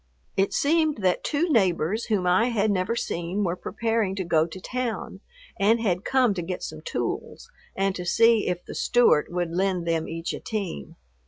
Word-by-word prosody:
It 195 Hz, 0 st, +2 dB
seemed 310 Hz, 0 st, +2 dB
that 185 Hz, -1 st, +2 dB
two 310 Hz, +4 st, 0 dB
neighbors 195 Hz, -, +1 dB
whom 205 Hz, -5 st, 0 dB
I 180 Hz, +6 st, +4 dB
had 220 Hz, -3 st, +1 dB
never 195 Hz, +4 st, 0 dB
seen 175 Hz, -1 st, -2 dB
were 175 Hz, -2 st, 0 dB
preparing 220 Hz, 0 st, -1 dB
to 190 Hz, -, -2 dB
go 160 Hz, -2 st, +2 dB
to 180 Hz, +3 st, -9 dB
town, 250 Hz, +3 st, -4 dB, 0.4 s
and 215 Hz, +4 st, +4 dB
had 190 Hz, -4 st, 0 dB
come 255 Hz, -5 st, +3 dB
to 180 Hz, -, -3 dB
get 180 Hz, +2 st, -5 dB
some 155 Hz, 0 st, -6 dB
tools 120 Hz, -6 st, -4 dB, 0.2 s
and 195 Hz, 0 st, +1 dB
to 180 Hz, -, -5 dB
see 225 Hz, +4 st, +4 dB
if 180 Hz, -1 st, -2 dB
the -, -, -8 dB
Stewart 240 Hz, -12 st, +3 dB
would 175 Hz, -1 st, -2 dB
lend 180 Hz, -1 st, 0 dB
them 165 Hz, -1 st, 0 dB
each 165 Hz, +1 st, -4 dB
a -, -, -5 dB
team. 195 Hz, -, -5 dB
195 Hz, 185 wpm, -25 LUFS, 175-225 Hz, 0.4 s, I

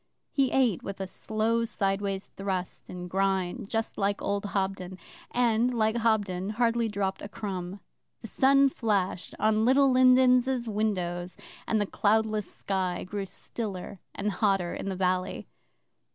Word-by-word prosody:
He 270 Hz, -2 st, +2 dB
ate 250 Hz, -9 st, +2 dB
with 195 Hz, -1 st, -6 dB
a 190 Hz, -, -2 dB
slow 220 Hz, +4 st, -1 dB
sideways 195 Hz, -2 st, -2 dB
thrust 190 Hz, -2 st, -4 dB
and 180 Hz, 0 st, -6 dB
grind, 190 Hz, 0 st, -1 dB
just 225 Hz, 0 st, -2 dB
like 200 Hz, 0 st, +1 dB
old 200 Hz, 0 st, -2 dB
Hobden, 190 Hz, -2 st, -2 dB, 0.3 s
and, 240 Hz, 0 st, +2 dB
like 220 Hz, 0 st, +2 dB
Hobden, 205 Hz, -5 st, +1 dB
hardly 235 Hz, -1 st, +2 dB
dropped 200 Hz, -2 st, -2 dB
a 205 Hz, -, -7 dB
crumb. 190 Hz, -2 st, -5 dB, 0.4 s
The 225 Hz, -, -7 dB
sun 275 Hz, +3 st, +4 dB
flashed 200 Hz, -8 st, -1 dB
on 215 Hz, +1 st, +2 dB
Little 270 Hz, +3 st, +5 dB
Lindens' 255 Hz, -1 st, +4 dB
windows, 185 Hz, -5 st, -2 dB, 0.3 s
and 220 Hz, -, +2 dB
the 205 Hz, -, +1 dB
cloudless 215 Hz, 0 st, +1 dB
sky 185 Hz, -2 st, -2 dB
grew 195 Hz, +1 st, -4 dB
stiller 200 Hz, -2 st, -6 dB, 0.2 s
and 205 Hz, +1 st, -1 dB
hotter 195 Hz, -3 st, +1 dB
in -, -, -4 dB
the 190 Hz, -, -2 dB
valley. 185 Hz, 0 st, -1 dB
205 Hz, 140 wpm, -28 LUFS, 190-230 Hz, 0.4 s, Little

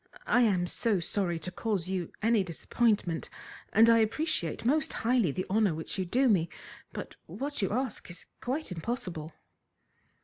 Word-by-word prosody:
I 245 Hz, -, +4 dB
am 195 Hz, -7 st, +3 dB
so 205 Hz, +2 st, +1 dB
sorry 175 Hz, 0 st, 0 dB
to 175 Hz, +3 st, -6 dB
cause 195 Hz, -3 st, -2 dB
you 185 Hz, -3 st, -2 dB
any 225 Hz, -2 st, +4 dB
disappointment, 185 Hz, 0 st, 0 dB, 0.4 s
and 225 Hz, +2 st, +6 dB
I 230 Hz, 0 st, +6 dB
appreciate 225 Hz, -, 0 dB
most 310 Hz, +5 st, +2 dB
highly 235 Hz, -5 st, +2 dB
the 185 Hz, +5 st, -3 dB
honour 200 Hz, -4 st, +2 dB
which 160 Hz, +4 st, -4 dB
you 185 Hz, -, 0 dB
do 255 Hz, +9 st, +2 dB
me, 175 Hz, -7 st, +3 dB, 0.4 s
but -, -, -7 dB
what 285 Hz, -1 st, -4 dB
you 195 Hz, -, +1 dB
ask 250 Hz, -1 st, -2 dB
is 170 Hz, 0 st, -7 dB, 0.2 s
quite 270 Hz, 0 st, -3 dB
impossible." 180 Hz, -4 st, -4 dB
205 Hz, 160 wpm, -30 LUFS, 175-240 Hz, 0.4 s, and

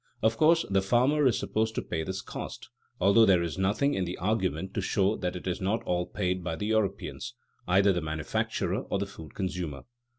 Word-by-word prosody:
Of 110 Hz, 0 st, +3 dB
course 165 Hz, +6 st, +4 dB
the 95 Hz, -1 st, +2 dB
farmer 130 Hz, +8 st, +3 dB
is 120 Hz, -, +2 dB
supposed 110 Hz, 0 st, -1 dB
to -, -, 0 dB
pay 80 Hz, -, -3 dB
this 95 Hz, +4 st, -4 dB
cost, -, -, -7 dB, 0.3 s
although 100 Hz, +5 st, +6 dB
there 95 Hz, -5 st, +5 dB
is 85 Hz, +2 st, -4 dB
nothing 105 Hz, +9 st, +2 dB
in 95 Hz, -, 0 dB
the 90 Hz, 0 st, -4 dB
argument 95 Hz, -1 st, -1 dB
to 105 Hz, -, -1 dB
show 100 Hz, +2 st, +1 dB
that 90 Hz, 0 st, -3 dB
it 90 Hz, -, -7 dB
is 90 Hz, 0 st, -2 dB
not 110 Hz, +5 st, 0 dB
all 90 Hz, -4 st, -1 dB
paid 90 Hz, -2 st, -2 dB
by 85 Hz, -2 st, -2 dB
the 90 Hz, -, -4 dB
European, 110 Hz, -2 st, -1 dB, 0.5 s
either 95 Hz, +2 st, +4 dB
the 90 Hz, -, -1 dB
manufacturer 80 Hz, -1 st, -2 dB
or -, -, -1 dB
the 100 Hz, -, -1 dB
food 80 Hz, -6 st, -12 dB
consumer. 90 Hz, -7 st, -3 dB
95 Hz, 205 wpm, -28 LUFS, 90-110 Hz, 0.5 s, although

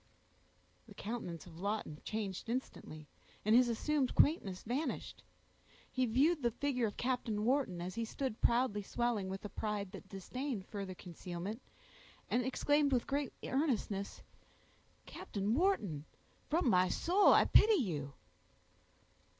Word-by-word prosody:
The -, -, -13 dB
countenance 200 Hz, -7 st, -5 dB
of 170 Hz, -2 st, -12 dB
Lawton 200 Hz, -6 st, -3 dB
changed 215 Hz, -1 st, -4 dB
instantly, 155 Hz, -, -5 dB, 0.4 s
and 215 Hz, +2 st, +5 dB
his 245 Hz, 0 st, +6 dB
assumed 270 Hz, +3 st, 0 dB
quaintness 200 Hz, -, +3 dB
vanished. 260 Hz, +8 st, -3 dB, 0.7 s
He 255 Hz, -1 st, +1 dB
viewed 285 Hz, +8 st, +3 dB
the 240 Hz, -, +2 dB
figure 250 Hz, -1 st, 0 dB
of 205 Hz, -, -7 dB
Captain 240 Hz, -4 st, -1 dB
Wharton, 250 Hz, -8 st, +1 dB
as 180 Hz, +1 st, -4 dB
he 230 Hz, -, -2 dB
stood 230 Hz, 0 st, -4 dB
proudly 235 Hz, -3 st, +2 dB
swelling 220 Hz, -2 st, -1 dB
with 195 Hz, +2 st, -5 dB
a -, -, -4 dB
pride 205 Hz, -3 st, -3 dB
that 195 Hz, -1 st, -10 dB
disdained 215 Hz, +3 st, -4 dB
further 195 Hz, -3 st, -5 dB
concealment, 180 Hz, +5 st, -6 dB, 0.7 s
and 250 Hz, -, +2 dB
exclaimed 290 Hz, +3 st, +2 dB
with 250 Hz, -3 st, +2 dB
great 280 Hz, -1 st, -1 dB
earnestness,— 235 Hz, -8 st, -1 dB, 0.8 s
"Captain 205 Hz, +1 st, -3 dB
Wharton, 225 Hz, -, +1 dB, 0.4 s
from 320 Hz, -1 st, +2 dB
my 185 Hz, -4 st, +4 dB
soul 370 Hz, -, +4 dB
I -, -, +6 dB
pity 435 Hz, 0 st, +6 dB
you!" 155 Hz, -, -2 dB
225 Hz, 135 wpm, -35 LUFS, 195-260 Hz, 0.8 s, his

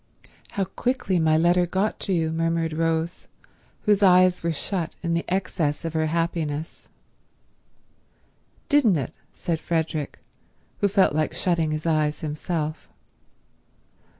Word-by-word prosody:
"How 195 Hz, -, 0 dB
quickly 195 Hz, -2 st, -1 dB
my 155 Hz, -1 st, +3 dB
letter 175 Hz, +2 st, +3 dB
got 195 Hz, +4 st, -1 dB
to 195 Hz, -, -3 dB
you," 165 Hz, -3 st, +1 dB
murmured 165 Hz, 0 st, 0 dB
Rose, 165 Hz, +1 st, -1 dB, 0.5 s
whose 210 Hz, -2 st, +3 dB
eyes 185 Hz, -1 st, +5 dB
were 170 Hz, -, 0 dB
shut 165 Hz, +1 st, -3 dB
in 170 Hz, -1 st, 0 dB
the 170 Hz, -, 0 dB
excess 170 Hz, -5 st, -1 dB
of 165 Hz, -, -3 dB
her 160 Hz, -1 st, +1 dB
happiness. 165 Hz, -2 st, -2 dB, 1.8 s
"Didn't 255 Hz, -, +4 dB
it," 140 Hz, +2 st, -4 dB, 0.2 s
said 165 Hz, -2 st, -3 dB
Frederick, 160 Hz, -3 st, -2 dB, 0.6 s
who 205 Hz, -, +3 dB
felt 195 Hz, -5 st, +3 dB
like 155 Hz, 0 st, 0 dB
shutting 170 Hz, -3 st, +1 dB
his 155 Hz, +1 st, -3 dB
eyes 155 Hz, -2 st, +1 dB
himself. 155 Hz, 0 st, -3 dB
165 Hz, 125 wpm, -24 LUFS, 155-185 Hz, 1.8 s, eyes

